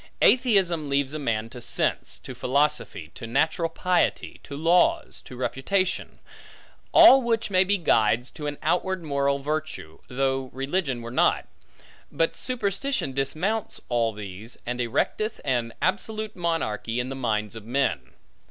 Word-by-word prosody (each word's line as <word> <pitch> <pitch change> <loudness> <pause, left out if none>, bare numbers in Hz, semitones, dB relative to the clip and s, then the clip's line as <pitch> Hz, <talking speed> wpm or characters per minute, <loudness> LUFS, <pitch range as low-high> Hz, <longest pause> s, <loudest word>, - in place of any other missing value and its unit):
Atheism 195 - +3
leaves 140 0 +1
a 155 - -3
man 115 -5 -1
to 125 - -9
sense, 120 - -1
to - - -9
philosophy, 140 - 0
to 115 - -8
natural 160 +7 +1
piety, 180 +2 0
to 140 - -8
laws, 180 - +2
to 125 - -10
reputation; 185 +9 -1 0.7
all 270 +1 +9
which 230 -3 -1
may 185 -1 +5
be 200 +2 +1
guides 120 - +2
to 150 - -6
an 145 0 -4
outward 185 0 0
moral 140 -2 +1
virtue, 145 - -4
though 135 0 -1
religion 135 -2 -2
were 115 - -7
not; 125 - +2 0.6
but 165 - 0
superstition 245 - -1
dismounts 160 +11 -2
all 120 -2 +1
these, 105 +2 -8
and 125 +1 -3
erecteth 215 - -1
an 120 -4 0
absolute 215 +3 -1
monarchy, 125 - -2
in 125 +1 -2
the 135 - -5
minds 110 -4 -2
of 110 - -8
men. 105 - -1
140 Hz, 145 wpm, -25 LUFS, 120-185 Hz, 0.7 s, all